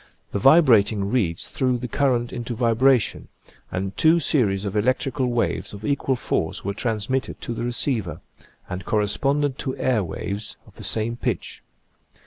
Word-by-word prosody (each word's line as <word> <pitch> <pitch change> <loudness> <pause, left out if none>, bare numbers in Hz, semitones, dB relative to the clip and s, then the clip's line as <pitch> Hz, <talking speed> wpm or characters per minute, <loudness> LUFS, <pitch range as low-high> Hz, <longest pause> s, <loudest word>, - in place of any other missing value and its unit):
The 100 - -1
vibrating 110 - +5
reeds 95 -10 -1
threw 130 -2 +1
the 125 +1 -5
current 125 -1 0
into 120 0 -4
vibration 120 +1 +2 0.4
and 95 +2 -3
two 160 +1 +5
series 105 - +1
of 100 - -3
elec 115 +5 +2
trical 135 -1 -2
waves 120 -3 -1
of 105 +2 -8
equal 140 -2 0
force 120 - -2
were 100 - -1
transmitted 115 +4 -2
to 120 - -4
the 115 - -5
receiver, 120 - -1 0.5
and 90 +1 -5
corresponded 135 +8 0
to 130 - -3
air 120 -6 +1
waves 100 +5 -4
of - - -20
the - - -9
same 115 +2 -1
pitch. - - -3
120 Hz, 155 wpm, -23 LUFS, 105-130 Hz, 0.5 s, vibrating